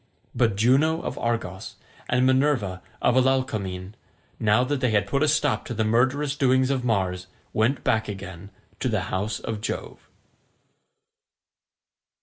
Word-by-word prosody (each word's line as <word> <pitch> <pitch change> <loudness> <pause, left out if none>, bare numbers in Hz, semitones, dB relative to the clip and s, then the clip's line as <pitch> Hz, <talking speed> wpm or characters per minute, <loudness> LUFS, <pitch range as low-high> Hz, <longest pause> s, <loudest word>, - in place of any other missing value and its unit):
But 115 -5 +2
Juno 140 - +3
of - - -4
Argos 115 -6 -3 0.3
and 125 +1 +3
Minerva 130 -8 +1 0.2
of 125 - +4
Alalcomene, 110 -8 0 0.5
now 110 +3 +3
that 140 +2 -1
they 130 -1 +1
had 105 -3 +2
put 140 +7 -1
a 155 - +3
stop 150 -1 +1
to 120 - -5
the 110 - +1
murderous 130 +6 +1
doings 130 -1 +3
of 130 -2 -1
Mars, 95 -6 -1 0.3
went 115 +6 +1
back 110 -1 +1
again 95 -2 -8 0.3
to - - 0
the - - 0
house 100 +3 -1
of 110 -2 -5
Jove. - - -6
115 Hz, 140 wpm, -25 LUFS, 100-130 Hz, 0.5 s, of